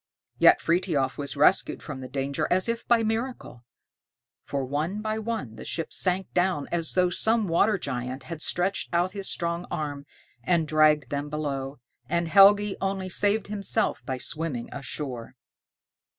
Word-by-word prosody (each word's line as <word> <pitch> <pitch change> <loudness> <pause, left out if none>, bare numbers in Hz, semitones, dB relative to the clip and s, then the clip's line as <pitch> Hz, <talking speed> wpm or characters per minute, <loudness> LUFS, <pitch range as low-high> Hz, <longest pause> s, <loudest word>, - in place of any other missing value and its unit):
Yet - - +6
Frithiof 165 -7 0
was 140 0 -4
rescued 150 +7 +3
from 140 -4 -7
the 130 - -6
danger 140 +3 -2
as 185 +3 +2
if 230 0 -3
by 235 -1 +4
miracle; 225 - -3 0.8
for 140 -2 -3
one 155 +9 -2
by 215 0 -2
one 215 - -4
the - - -8
ships 165 - -3
sank 185 0 0
down 180 -5 +1
as 165 -2 -1
though 180 -1 +3
some 220 +3 +3
water 200 +5 +3
giant 125 -4 -4
had 165 -3 -7
stretched 185 +4 -1
out 175 +2 +2
his 195 -1 -5
strong 170 +1 -2
arm, 145 -2 -4 0.4
and 170 -3 +1
dragged 155 -3 +3
them 145 +1 -3
below, 140 -2 -3 0.3
and 170 +1 0
Helgi 200 +3 +6
only 195 -1 -2
saved 205 +3 +1
himself 210 +2 -1
by 130 -2 -3
swimming 140 -2 -3
ashore. 130 -4 -6
170 Hz, 155 wpm, -26 LUFS, 140-195 Hz, 0.8 s, Yet